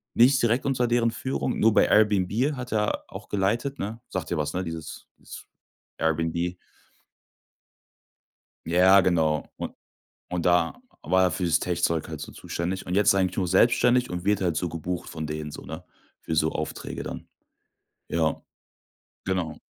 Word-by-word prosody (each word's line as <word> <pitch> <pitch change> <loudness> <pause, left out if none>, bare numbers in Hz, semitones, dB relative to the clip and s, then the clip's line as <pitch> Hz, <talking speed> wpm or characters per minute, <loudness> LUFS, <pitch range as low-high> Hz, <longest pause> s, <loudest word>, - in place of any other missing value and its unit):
Nicht 130 +3 +5
direkt 120 +2 +1
unter 125 -3 +1
deren 120 -1 +2
Führung, 130 +1 -2
nur 110 0 +4
bei - - +5
Airbnb 105 +6 +3
hat 125 -1 -7
er 105 -1 0
auch - - -10
geleitet, 115 +8 0
ne? 110 +4 -5
Sagt 90 -3 -4
dir 85 - 0
was, 75 -1 -2
ne, 90 - -1
dieses 80 -3 -7
dieses - - -11 0.5
Airbnb. 80 +2 -1 2.1
Ja, 90 +3 +6
genau. 80 -4 +1
Und - - -5 0.6
und 90 -1 -2
da 90 - +2 0.2
war 95 0 +3
er 90 - +3
für's 85 -1 +1
Tech-Zeug 85 -3 0
halt - - -6
so - - -7
zuständig. 90 +3 -4
Und 90 - -2
jetzt 105 -1 +3
ist - - +8
er 95 - +3
eigentlich 90 -1 0
nur 95 - 0
selbstständig 120 +6 +3
und 90 0 -4
wird 105 0 +2
halt 85 -4 0
so 90 - -1
gebucht 85 +2 -4
von 80 -1 -5
denen 75 0 -5
so, - - -8
ne, 80 +3 -8 0.4
für 80 - -3
so 80 0 +2
Aufträge 75 - -5
dann. - - -7 0.8
Ja, 80 -1 0 0.8
genau. - - -2
90 Hz, 165 wpm, -26 LUFS, 80-110 Hz, 2.1 s, ist